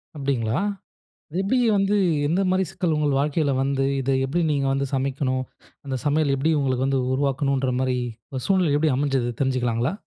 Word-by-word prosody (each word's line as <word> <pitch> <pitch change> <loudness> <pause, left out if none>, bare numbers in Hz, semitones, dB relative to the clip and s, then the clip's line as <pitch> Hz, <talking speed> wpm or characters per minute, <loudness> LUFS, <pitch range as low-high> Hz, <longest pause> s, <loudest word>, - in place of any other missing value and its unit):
அப்பிடிங்களா! 135 -2 -1 0.7
அது 170 - -4
எப்படி 230 +7 +1 0.2
வந்து, 195 +1 +2 0.3
எந்த 175 +5 +1
மாரி 185 0 +2
சிக்கல் 170 -3 -1
உங்கள் 145 -2 +1
வாழ்க்கையில 145 0 +1
வந்து, 135 0 0 0.2
இதை 135 +1 0
எப்பிடி 170 +6 0
நீங்க 140 -2 +1
வந்து 135 0 0
சமைக்கணும், 130 -1 -1 0.4
அந்த 135 -2 -3
சமையல் 145 -1 +2
எப்பிடி 150 +4 +1
உங்களுக்கு 130 -1 0
வந்து 135 -1 +1
உருவாக்கனுன்ற 135 -1 0
மாரி, 130 -1 0 0.3
ஒரு 130 -2 -4
சூழ்நிலை 185 -6 +2
எப்பிடி 150 -2 +2
அமைஞ்சது? 135 -4 0
தெரிஞ்சுக்கலாங்களா! 125 +1 0
140 Hz, 160 wpm, -23 LUFS, 130-150 Hz, 0.7 s, வந்து